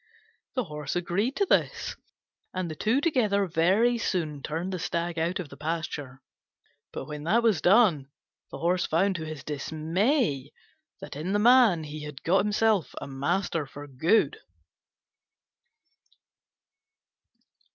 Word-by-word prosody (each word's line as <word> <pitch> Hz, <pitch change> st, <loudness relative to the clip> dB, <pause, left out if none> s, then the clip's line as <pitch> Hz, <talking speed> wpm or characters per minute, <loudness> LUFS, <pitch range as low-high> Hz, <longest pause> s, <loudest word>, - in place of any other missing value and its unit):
The 255 Hz, -, +1 dB
Horse 150 Hz, -4 st, -5 dB
agreed 180 Hz, +9 st, -1 dB
to 400 Hz, -, +2 dB
this, -, -, 0 dB, 0.6 s
and 180 Hz, -3 st, -2 dB
the -, -, -6 dB
two 225 Hz, -, +1 dB
together 215 Hz, -, +2 dB
very 195 Hz, +8 st, +2 dB
soon 155 Hz, -9 st, -2 dB
turned 165 Hz, +7 st, -3 dB
the 185 Hz, -, -3 dB
Stag 170 Hz, 0 st, -2 dB
out 170 Hz, +4 st, -1 dB
of 170 Hz, -5 st, -5 dB
the 140 Hz, -, -12 dB
pasture: 150 Hz, -4 st, -4 dB, 0.7 s
but -, -, -6 dB
when 150 Hz, 0 st, -7 dB
that 225 Hz, +8 st, +3 dB
was 220 Hz, -7 st, +3 dB
done, 180 Hz, -, +4 dB, 0.4 s
the -, -, -7 dB
Horse 175 Hz, +2 st, +1 dB
found 190 Hz, +5 st, +2 dB
to 160 Hz, -, -5 dB
his 155 Hz, -2 st, -7 dB
dismay 160 Hz, -, -1 dB, 0.5 s
that -, -, -8 dB
in 165 Hz, +7 st, -3 dB
the -, -, +3 dB
man 225 Hz, -6 st, +5 dB
he 150 Hz, 0 st, -7 dB
had 150 Hz, -2 st, -9 dB
got 190 Hz, +4 st, +3 dB, 0.5 s
a -, -, -6 dB
master 155 Hz, +3 st, -1 dB
for 145 Hz, +1 st, -9 dB
good. 145 Hz, -, +1 dB
170 Hz, 135 wpm, -27 LUFS, 150-200 Hz, 0.7 s, man